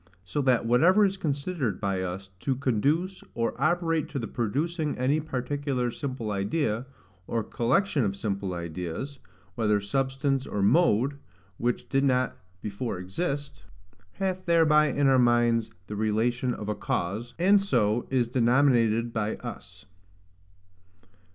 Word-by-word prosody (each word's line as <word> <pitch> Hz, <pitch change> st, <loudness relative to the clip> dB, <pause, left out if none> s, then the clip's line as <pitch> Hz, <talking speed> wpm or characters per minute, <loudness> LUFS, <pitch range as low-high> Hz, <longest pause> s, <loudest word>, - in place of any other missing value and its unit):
So 95 Hz, +11 st, -2 dB
that 130 Hz, -4 st, +2 dB
whatever 175 Hz, -, +5 dB
is 195 Hz, 0 st, 0 dB
considered 145 Hz, -, -2 dB
by 100 Hz, -3 st, -1 dB
us 95 Hz, +1 st, -5 dB
to 135 Hz, +6 st, -1 dB
conduce 140 Hz, -, 0 dB
or 115 Hz, 0 st, 0 dB
operate 165 Hz, -1 st, +1 dB
to 145 Hz, -, -5 dB
the 115 Hz, -4 st, -3 dB
producing 150 Hz, -, -2 dB
any 135 Hz, +5 st, +2 dB
particular 135 Hz, -3 st, -2 dB
simple 125 Hz, -5 st, -4 dB
idea, 110 Hz, +4 st, -1 dB, 0.4 s
or 115 Hz, -1 st, -1 dB
collection 140 Hz, -, +1 dB
of 100 Hz, -2 st, -1 dB
simple 100 Hz, -2 st, -3 dB
ideas, 85 Hz, -, -5 dB, 0.3 s
whether 105 Hz, -3 st, +2 dB
substance 135 Hz, +5 st, -1 dB
or 100 Hz, -, -1 dB
mode, 140 Hz, -, +3 dB, 0.4 s
which 120 Hz, +1 st, -1 dB
did 135 Hz, 0 st, +1 dB
not 130 Hz, -2 st, +2 dB, 0.3 s
before 105 Hz, +1 st, -3 dB
exist, 140 Hz, -, -4 dB, 0.5 s
hath 185 Hz, -1 st, -3 dB
thereby 155 Hz, -2 st, +5 dB
in 145 Hz, -1 st, +1 dB
our 135 Hz, -1 st, +5 dB
minds 120 Hz, -2 st, +3 dB, 0.2 s
the 105 Hz, -, -6 dB
relation 115 Hz, +4 st, 0 dB
of 105 Hz, -, -7 dB
a 105 Hz, -, 0 dB
cause, 105 Hz, +3 st, -3 dB
and 195 Hz, +4 st, +5 dB
so 120 Hz, -, +1 dB
is 125 Hz, -3 st, +1 dB
denominated 120 Hz, -2 st, +3 dB
by 110 Hz, -1 st, -1 dB
us. -, -, -9 dB
125 Hz, 135 wpm, -27 LUFS, 110-145 Hz, 0.5 s, whatever